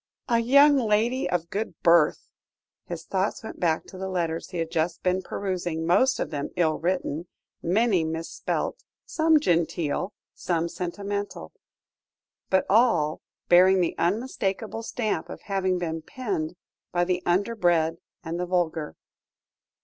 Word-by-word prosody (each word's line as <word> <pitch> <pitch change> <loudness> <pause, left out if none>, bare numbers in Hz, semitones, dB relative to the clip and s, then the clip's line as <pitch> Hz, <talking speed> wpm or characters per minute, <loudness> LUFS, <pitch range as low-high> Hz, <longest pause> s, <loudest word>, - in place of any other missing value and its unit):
"A 235 -1 +3
young 280 +5 +6
lady 235 +2 +1
of 170 -1 -2
good 215 +3 -3
birth!" 170 -3 +4 0.6
His 170 -2 -6
thoughts 195 +5 -1
went 220 - -8
back 165 -3 +1
to 185 - -11
the 190 0 -3
letters 170 -3 -2
he 180 - -6
had 165 -1 -2
just 165 0 -1
been 185 0 +1
perusing, 175 -4 -3
most 215 +10 +3
of - - -2
them 145 -2 -3
ill 160 -3 +1
written, 175 -2 -2 0.3
many 195 0 +2
mis 160 +1 -3
spelt, - - -3 0.2
some 320 -1 +3
genteel, 170 - 0 0.2
some 170 -1 -1
sentimental 200 +3 -4 1.0
but 190 -1 +3
all 185 -9 +3 0.3
bearing 185 +2 +6
the 175 - +1
unmistakable 215 +2 -1
stamp 225 -1 -2
of - - -8
having 190 -2 0
been 165 -2 -3
penned 180 -5 -4 0.4
by 175 0 +2
the 180 0 0
underbred 175 -4 +2 0.3
and 165 +1 -4
the 180 - -2
vulgar. 165 -4 -1
180 Hz, 140 wpm, -26 LUFS, 165-205 Hz, 1.0 s, young